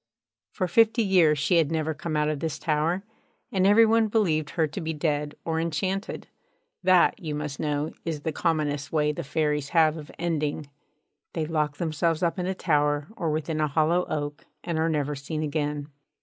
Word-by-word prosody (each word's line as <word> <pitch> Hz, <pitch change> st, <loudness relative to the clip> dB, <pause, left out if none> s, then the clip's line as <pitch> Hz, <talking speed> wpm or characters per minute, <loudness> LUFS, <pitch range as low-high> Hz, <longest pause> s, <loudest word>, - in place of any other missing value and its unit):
For 185 Hz, -, -2 dB
fifty 225 Hz, +4 st, +4 dB
years 175 Hz, -7 st, +4 dB
she 165 Hz, +5 st, +2 dB
had 160 Hz, -2 st, +2 dB
never 160 Hz, -1 st, 0 dB
come 155 Hz, +1 st, -3 dB
out 150 Hz, 0 st, +2 dB
of 155 Hz, -2 st, -1 dB
this 160 Hz, -1 st, -3 dB
tower, 165 Hz, +4 st, 0 dB, 0.5 s
and 190 Hz, -1 st, +3 dB
every 220 Hz, +3 st, +7 dB
one 225 Hz, 0 st, +3 dB
believed 170 Hz, -9 st, +1 dB
her 165 Hz, -3 st, +1 dB
to 150 Hz, +5 st, -5 dB
be 160 Hz, 0 st, -2 dB
dead 150 Hz, -1 st, -1 dB
or 160 Hz, -1 st, 0 dB
enchanted. 185 Hz, +5 st, -2 dB, 0.6 s
That, 185 Hz, +5 st, +4 dB
you 155 Hz, -4 st, -3 dB
must 150 Hz, -2 st, -4 dB
know, 150 Hz, 0 st, -1 dB
is 160 Hz, -3 st, -3 dB
the 160 Hz, -, -2 dB
commonest 150 Hz, -3 st, -1 dB
way 150 Hz, -1 st, +2 dB
the 170 Hz, +3 st, -5 dB
Fairies 150 Hz, -1 st, -1 dB
have 160 Hz, -1 st, +5 dB
of 150 Hz, -1 st, -9 dB
ending: 155 Hz, -3 st, -1 dB, 0.7 s
they 160 Hz, -2 st, -1 dB
lock 150 Hz, -2 st, -1 dB
themselves 165 Hz, +1 st, 0 dB
up 170 Hz, +2 st, 0 dB
in 180 Hz, -, -1 dB
a 190 Hz, -, -1 dB
tower 145 Hz, -3 st, +1 dB
or 170 Hz, -6 st, -2 dB
within 155 Hz, +1 st, -1 dB
a 155 Hz, -, +2 dB
hollow 160 Hz, +5 st, +2 dB
oak, 145 Hz, -1 st, -4 dB, 0.2 s
and 170 Hz, -3 st, -2 dB
are 160 Hz, +1 st, +2 dB
never 150 Hz, -2 st, 0 dB
seen 155 Hz, +3 st, -4 dB
again. 145 Hz, -1 st, -2 dB
155 Hz, 190 wpm, -26 LUFS, 150-170 Hz, 0.7 s, every